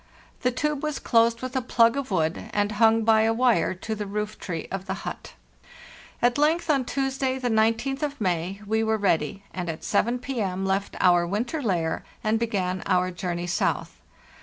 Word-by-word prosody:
The 250 - +2
tube 295 +3 -1
was 305 -2 -2
closed 230 0 +2
with 255 +1 -5
a 260 - +1
plug 235 -1 +3
of 280 -2 -3
wood 165 -4 -1
and 205 0 +1
hung 225 +1 +4
by 220 0 +5
a 225 +1 +3
wire 245 -5 +2
to 220 +5 -5
the 210 -1 -4
roof 210 +1 -4
tree 165 -4 -5
of 190 0 -4
the 190 +1 -4
hut. - - -6 0.9
At 245 +3 +3
length, 315 +2 +2
on 270 -4 +1
Tuesday, 270 0 -1
the 250 -2 -1
19th 225 +5 +1
of 290 -1 -3
May, 185 0 -1
we 220 +2 +1
were 220 0 +1
ready, 195 -2 0
and 180 -2 -4
at 160 - -5
7 235 +4 +1
p.. 250 -3 -3
left 190 +1 -1
our 175 -1 +4
winter 240 - -2
lair 175 -9 -1 0.2
and 215 +1 +1
began 190 -5 -1
our 185 -1 +2
journey 175 0 -3
south. 175 -1 -1
220 Hz, 185 wpm, -25 LUFS, 185-250 Hz, 0.9 s, by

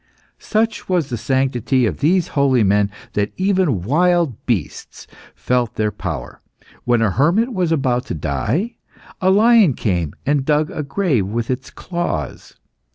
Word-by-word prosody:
Such 220 -1 -1
was 175 -6 +1
the - - -1
sanctity 130 0 0
of - - -2
these 170 +4 +2
holy 135 -5 +2
men 100 0 +2 0.2
that 105 -1 -1
even 185 - +1
wild 165 - +1
beasts 105 - -3 0.3
felt 125 -3 -1
their 105 -1 0
power. - - -6 0.4
When 120 -2 +2
a 105 - +2
hermit 185 - +2
was 180 -5 0
about 130 -5 0
to - - -4
die, 110 - -2 0.4
a 185 - +3
lion 210 - +5
came 85 -8 -2
and 145 -1 +1
dug 150 +1 +1
a - - -4
grave 140 - 0
with 115 +4 -2
its 130 +1 -4
claws. 170 - -5
135 Hz, 150 wpm, -19 LUFS, 115-180 Hz, 0.4 s, lion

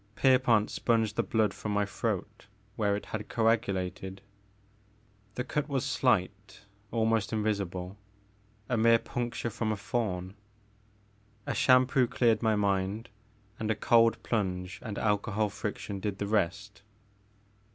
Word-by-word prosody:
Pierpont 125 -5 +3
sponged 115 -3 +1
the - - +2
blood 110 -2 +1
from 105 - -4
my 105 0 +2
throat 100 +1 -4 0.3
where 105 -2 +1
it 105 - -5
had 110 -1 -6
coagulated. 100 -4 -1 1.1
The 125 - -2
cut 150 +3 -2
was 135 -3 -1
slight, 100 -4 0 0.2
almost 110 -1 +1
invisible, 100 -3 -2 0.7
a 125 - 0
mere 115 +1 +5
puncture 120 0 -4
from 110 -1 -2
a 105 - -2
thorn. 100 -4 -2 1.1
A - - -2
shampoo 130 0 +4
cleared 115 -2 +2
my 110 -2 +2
mind, 100 +2 0 0.5
and 110 - -2
a 110 - +2
cold 115 +1 +3
plunge 90 -4 -2
and 105 -4 -6
alcohol 105 0 0
friction 100 0 -5
did 100 0 -3
the 100 - -2
rest. 100 0 -1
105 Hz, 130 wpm, -29 LUFS, 100-115 Hz, 1.1 s, mere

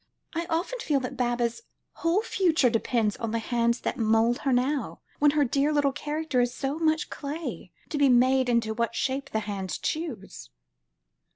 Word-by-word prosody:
I 335 0 -2
often 350 +10 -1
feel 295 -9 +1
that 255 +1 -5
Baba's 240 - -1 0.4
whole 340 +6 +1
future 330 - +2
depends 225 -2 0
on 230 - -3
the 230 - -1
hands 235 +1 0
that - - -3
mould 225 +2 +3
her 275 - 0
now, 260 +3 0 0.2
when 295 - +5
her 290 0 +2
dear 275 +4 +1
little 290 -2 +2
character 295 -1 -1
is 245 0 +1
so 275 +4 -2
much 315 -1 +1
clay, 305 +3 -5 0.2
to 295 - -2
be 280 -1 +5
made 255 +1 +4
into 230 -2 +1
what 235 +1 -1
shape 270 +1 -1
the 220 - -1
hands 200 -3 -4
choose." 300 - -5
265 Hz, 175 wpm, -27 LUFS, 235-300 Hz, 0.4 s, when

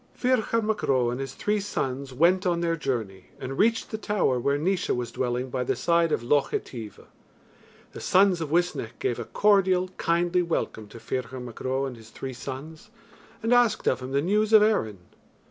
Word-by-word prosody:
Ferchar 235 -3 +1
Mac 215 0 -1
Ro 125 -3 +2
and 125 - -4
his 135 0 -5
three 210 0 0
sons 135 -9 -3
went 170 +8 +3
on 170 -1 +1
their 165 -1 +1
journey, 115 - -3
and 135 +1 -5
reached 225 +1 +2
the 220 - -4
tower 205 -12 +1
where 140 +4 +1
Naois 180 +5 -1
was 120 -1 -1
dwelling 125 +1 -2
by 125 0 -1
the - - 0
side 170 -1 +2
of 120 - 0
Loch 140 +3 +2
Etive. 110 -5 -6 0.9
The - - -9
sons 185 -2 +3
of 160 - -3
Uisnech 170 -8 -1
gave 120 - -2
a 120 - -4
cordial 190 - +3
kindly 175 +1 +1
welcome 165 -10 -2
to 110 - -12
Ferchar 130 +1 -4
Mac 120 -2 -9
Ro 130 +1 -1
and 130 -2 -5
his 110 0 -14
three 130 +2 -7
sons, 140 +8 -8 0.5
and 225 +2 +2
asked 245 -3 +3
of 130 - +2
him 130 +1 -7
the 140 +1 +1
news 210 +4 +1
of 215 -1 +8
Erin. 110 - +1
145 Hz, 195 wpm, -26 LUFS, 125-190 Hz, 0.9 s, of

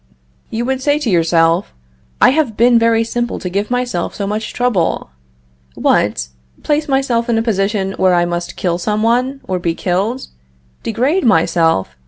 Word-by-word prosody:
You 235 +2 -3
would 265 0 -1
say 290 +2 +2
to 280 -8 -2
yourself: 165 +1 +2 0.4
"I - - +6
have 275 -7 0
been 235 +1 +5
very 230 0 +3
simple 240 +1 -3
to 180 - -5
give 200 +3 -2
myself 245 -8 -2
so 200 - -3
much 210 +2 -3
trouble. 205 - -1 0.6
What! - - +1 0.3
place 300 +1 0
myself 265 -4 0
in 230 - +2
a 225 - +1
position 195 -2 0
where 185 -1 +4
I 175 0 +2
must 175 0 -4
kill 175 -2 -1
some 210 +4 -1
one, 250 +4 +1
or 185 -1 -3
be 170 -1 -1
killed! 200 +10 -1 0.6
degrade 260 - 0
myself! 165 - +2
220 Hz, 165 wpm, -16 LUFS, 180-245 Hz, 0.6 s, I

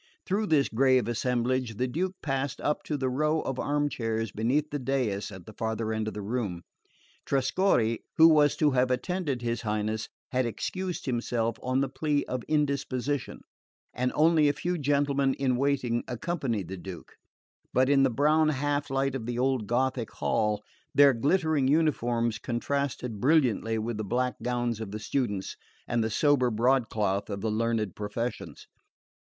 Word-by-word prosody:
Through 210 +3 0
this 150 -5 +3
grave 130 0 +3
assemblage 125 0 0
the 125 +5 0
Duke 180 +8 -2
passed 135 -1 -2
up 150 - 0
to 150 - -2
the 130 -1 -1
row 150 +5 +1
of 135 -1 -4
armchairs 115 -7 -1
beneath 135 +9 0
the 145 - -2
dais 125 -6 -1
at 95 -2 -10
the 110 - -11
farther 110 0 -2
end 110 0 -2
of 110 - -4
the 105 - -5
room. 100 -6 -3 0.6
Trescorre, 130 - +1 0.2
who 160 0 +9
was 150 -2 +5
to 150 -2 +3
have 130 -1 +2
attended 140 -1 -1
his 115 -1 -1
Highness, 110 0 -2 0.2
had 125 -1 +1
excused 185 - -4
himself 120 -3 -1
on 130 +1 0
the 140 - +1
plea 145 +2 -1
of 130 -1 -3
indisposition, 140 -2 -1 0.5
and 125 0 0
only 155 -1 +4
a - - +1
few 175 +4 -2
gentlemen 140 -1 +1
in 130 -2 +1
waiting 125 -3 0
accompanied 125 - -2
the 95 +2 -6
Duke; 90 -1 -9 0.6
but 130 0 +3
in 140 0 +4
the 135 - +4
brown 150 +5 +3
half 145 0 -1
light 135 0 0
of 125 -4 -4
the 120 -1 -3
old 130 -4 0
Gothic 125 0 0
hall 105 -1 0 0.3
their 140 -1 +7
glittering 150 +2 +1
uniforms 120 -7 +1
contrasted 125 -3 -2
brilliantly 125 -6 +2
with 110 0 -3
the 110 - -3
black 125 +5 -1
gowns 120 -2 -1
of 110 - -5
the 105 +2 -5
students, 105 -4 -2 0.3
and 120 -2 +1
the 110 - -1
sober 130 +2 +3
broadcloth 110 -4 +1
of 100 -1 -4
the 110 - -1
learned 110 -2 -1
professions. 115 +4 -5
125 Hz, 165 wpm, -28 LUFS, 115-145 Hz, 0.6 s, who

